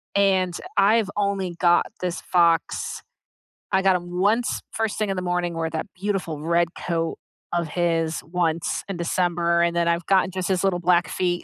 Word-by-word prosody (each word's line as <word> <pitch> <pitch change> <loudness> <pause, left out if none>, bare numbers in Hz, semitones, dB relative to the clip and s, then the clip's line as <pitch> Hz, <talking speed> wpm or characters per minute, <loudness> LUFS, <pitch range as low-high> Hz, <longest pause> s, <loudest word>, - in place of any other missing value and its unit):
and 190 -3 +3 0.2
I've 205 +1 +4
only 195 -3 -1
got 175 -1 +4 0.2
this 180 -1 -2
fox 170 -2 +1 0.7
I 190 - +4
got 190 -1 +4
him 175 0 -4
once 225 +6 +1
first 225 -1 -2
thing 215 -2 -1
in 195 - -1
the 185 - -2
morning- 175 -1 -1
where 165 0 -1
that 160 0 -3
beautiful 190 -5 -2
red 170 +2 +2
coat 165 -1 -2 0.4
of 170 -1 0
his- 165 -1 0
once 165 0 -1
in 195 - -3
December 170 0 +1
and 170 0 +1
then 170 0 +1
I've 170 0 0
gotten 190 -1 +3
just 185 -1 -3
his 185 -1 +1
little 190 -2 +1
black 175 0 +3
feet 175 -1 -1
175 Hz, 180 wpm, -24 LUFS, 170-190 Hz, 0.7 s, I've